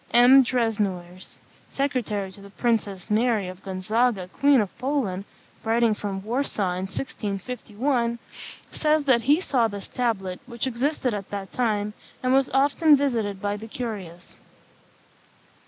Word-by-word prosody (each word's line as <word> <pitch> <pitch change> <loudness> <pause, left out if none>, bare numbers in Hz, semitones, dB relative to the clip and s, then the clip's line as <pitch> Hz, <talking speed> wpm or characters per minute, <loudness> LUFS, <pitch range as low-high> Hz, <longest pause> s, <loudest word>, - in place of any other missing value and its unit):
M. 245 +3 +8
Desnoyers, 200 -7 -2 0.3
secretary 235 -8 -1
to 200 - -13
the 200 - -12
Princess 210 -3 -1
Mary 220 -3 +2
of 185 0 -9
Gonzaga, 195 +2 0
Queen 280 +6 +4
of 205 -4 -2
Poland, 240 -8 -1 0.4
writing 230 0 +3
from 195 -2 -4
Warsaw 220 -5 -1
in 185 +1 -3
1651, 235 +3 -2 0.5
says 305 -1 +2
that 260 -4 +4
he 285 +7 +4
saw 255 -10 +2
this 200 -2 -7
tablet, 195 -7 -1
which 235 -1 -3
existed 260 0 -1
at 200 -2 -5
that 200 -2 -6
time, 210 -4 0 0.3
and 255 0 +2
was 270 0 +3
often 290 +2 +4
visited 225 -8 -1
by 205 +1 -1
the 215 +2 -8
curious. 200 -8 -7
225 Hz, 135 wpm, -25 LUFS, 200-255 Hz, 0.5 s, M